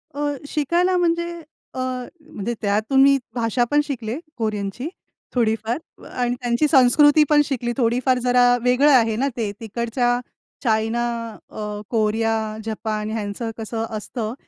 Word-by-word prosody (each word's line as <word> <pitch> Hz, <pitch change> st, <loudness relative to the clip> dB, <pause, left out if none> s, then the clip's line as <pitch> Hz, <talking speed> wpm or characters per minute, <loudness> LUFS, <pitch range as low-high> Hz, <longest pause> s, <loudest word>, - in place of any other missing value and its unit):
अ, 290 Hz, 0 st, -1 dB, 0.2 s
शिकायला 345 Hz, +5 st, +1 dB
म्हणजे 340 Hz, 0 st, +1 dB, 0.4 s
अ, -, -, -6 dB, 0.5 s
म्हणजे 230 Hz, -3 st, -4 dB
त्यातून 215 Hz, +6 st, +2 dB
मी 275 Hz, 0 st, +6 dB, 0.2 s
भाषा 235 Hz, 0 st, +1 dB
पण 295 Hz, 0 st, +4 dB
शिकले, 250 Hz, -5 st, -4 dB, 0.2 s
कोरियनची, 215 Hz, +2 st, -3 dB, 0.5 s
थोडीफार 225 Hz, +3 st, -2 dB
आणि 245 Hz, -1 st, -1 dB
त्यांची 240 Hz, +4 st, +2 dB
संस्कृती 290 Hz, +2 st, +6 dB
पण 300 Hz, -1 st, +6 dB
शिकली 245 Hz, -4 st, -2 dB
थोडीफार. 250 Hz, +1 st, +2 dB
जरा 245 Hz, 0 st, +4 dB, 0.2 s
वेगळं 250 Hz, +4 st, +4 dB
आहे 230 Hz, -5 st, +4 dB
ना 265 Hz, +5 st, 0 dB
ते, 220 Hz, -3 st, -1 dB
तिकडच्या 235 Hz, +2 st, -1 dB, 0.4 s
चायना, 225 Hz, 0 st, +1 dB, 0.5 s
अ, -, -, -13 dB, 0.3 s
कोरिया, 225 Hz, 0 st, +1 dB, 0.3 s
जपान 215 Hz, -1 st, -3 dB
ह्यांचं 220 Hz, +1 st, -3 dB
कसं 225 Hz, 0 st, -3 dB
असतं, 220 Hz, +1 st, -4 dB
240 Hz, 130 wpm, -22 LUFS, 220-270 Hz, 0.5 s, मी